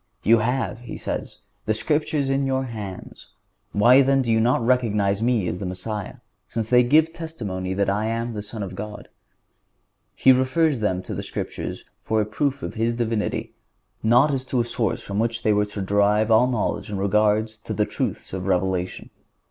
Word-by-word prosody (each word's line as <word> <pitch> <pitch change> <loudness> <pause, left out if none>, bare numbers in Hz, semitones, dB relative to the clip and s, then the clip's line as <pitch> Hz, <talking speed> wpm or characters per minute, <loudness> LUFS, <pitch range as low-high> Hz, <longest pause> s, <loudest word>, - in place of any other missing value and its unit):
"You 115 +1 +5
have," 115 -2 -1
He 120 -1 -8
says, - - -5 0.3
"the 110 - +2
Scriptures 150 +2 0
in 135 0 +1
your 130 0 0
hands; 105 -7 -8 0.4
why 120 +6 +6
then 135 0 +3
do 120 - 0
you 110 - +3
not 115 +1 +2
recognize 105 -5 +2
Me 115 -4 +2
as 90 - -3
the 100 - -4
Messiah, 95 +3 -5 0.3
since 115 0 -4
they 125 0 +7
give 155 +6 +4
testimony 105 - -4
that 100 0 +1
I 105 +3 0
am 115 +1 -2
the 105 - -4
Son 105 +1 -6
of 95 -1 -6
God?" 105 +2 -7 1.1
He 130 - +6
refers 130 +3 +2
them 95 -4 -1
to - - -6
the - - -3
Scriptures - - -5 0.2
for 110 - 0
a 105 - +1
proof 135 +5 -2
of - - -4
His 115 +1 0
Divinity, 115 -3 -2 0.5
not 120 +6 +4
as 135 -2 -1
to 130 -1 -1
a - - +3
source 115 -3 -2
from 100 +1 -3
which 115 +1 -1
they 110 - +3
were 105 0 +2
to 100 -1 -5
derive 105 +3 +2
all 115 +3 +6
knowledge 115 -2 -2
in 100 - -3
regard 105 +2 +2
to 110 -1 -10
the - - +1
truths - - -4
of 95 0 -4
revelation. 90 -1 -1
110 Hz, 190 wpm, -23 LUFS, 105-125 Hz, 1.1 s, they